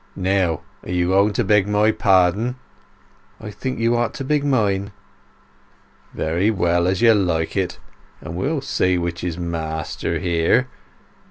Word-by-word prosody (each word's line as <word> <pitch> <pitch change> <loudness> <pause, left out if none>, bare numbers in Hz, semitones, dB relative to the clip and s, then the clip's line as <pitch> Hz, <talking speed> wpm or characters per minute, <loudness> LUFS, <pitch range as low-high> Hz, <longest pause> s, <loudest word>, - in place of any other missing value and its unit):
Now, 95 -4 0 0.2
are - - -12
you 90 0 0
going 100 +3 +3
to 120 - 0
beg 105 -1 +3
my 105 +1 +3
pardon?" 100 +5 +2 0.8
"I 105 - -8
think 130 +5 -4
you 115 +1 +1
ought 120 -1 -1
to - - -5
beg 145 +1 0
mine." 100 -7 0 1.2
"Very 85 +6 0
well—as 90 -1 +1
you 115 -1 +7
like. 85 -6 0
But 95 -3 -6
we'll - - -1
see 90 0 0
which 85 -1 -3
is 85 -2 -3
master 80 -3 -3
here. 90 +8 +1
95 Hz, 140 wpm, -21 LUFS, 85-110 Hz, 1.2 s, you